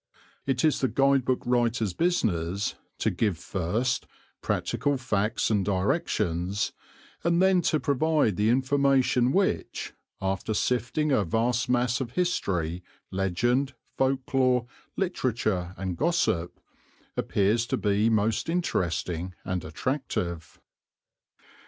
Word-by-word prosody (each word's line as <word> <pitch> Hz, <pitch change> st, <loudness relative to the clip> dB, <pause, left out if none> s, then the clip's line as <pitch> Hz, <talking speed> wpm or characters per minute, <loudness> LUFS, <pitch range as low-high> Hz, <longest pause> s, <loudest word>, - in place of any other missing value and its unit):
It 135 Hz, +1 st, +1 dB
is 155 Hz, -, +3 dB
the 130 Hz, -, +3 dB
guide 135 Hz, -1 st, +3 dB
book 130 Hz, 0 st, 0 dB
writer's 120 Hz, -5 st, +1 dB
business 100 Hz, -, 0 dB, 0.2 s
to -, -, +1 dB
give 105 Hz, -7 st, 0 dB
first 100 Hz, +8 st, -1 dB, 0.3 s
practical 140 Hz, +3 st, 0 dB
facts 110 Hz, -4 st, 0 dB
and 105 Hz, -2 st, +2 dB
directions, 100 Hz, -, 0 dB, 0.5 s
and 170 Hz, 0 st, +2 dB
then 190 Hz, -1 st, +4 dB
to 155 Hz, -2 st, +1 dB
provide 145 Hz, -, +2 dB
the 105 Hz, +3 st, +2 dB
information 130 Hz, -1 st, +3 dB
which, 195 Hz, +5 st, -1 dB, 0.3 s
after 95 Hz, +3 st, -2 dB
sifting 125 Hz, +7 st, 0 dB
a 120 Hz, -6 st, +3 dB
vast 115 Hz, +6 st, 0 dB
mass 125 Hz, +1 st, +1 dB
of 120 Hz, -2 st, -5 dB
history, 90 Hz, -, -1 dB, 0.3 s
legend, 120 Hz, +9 st, 0 dB, 0.2 s
folk 135 Hz, 0 st, 0 dB
lore, 130 Hz, -2 st, +3 dB, 0.3 s
literature, 110 Hz, -, -1 dB
and 95 Hz, -2 st, -3 dB
gossip, 150 Hz, -, 0 dB, 0.6 s
appears 110 Hz, +4 st, +1 dB
to -, -, 0 dB
be 105 Hz, +2 st, +2 dB
most 110 Hz, +5 st, +1 dB
interesting 90 Hz, -, -1 dB
and 90 Hz, -2 st, -2 dB
attractive. 85 Hz, -, -3 dB
120 Hz, 115 wpm, -27 LUFS, 95-135 Hz, 0.6 s, then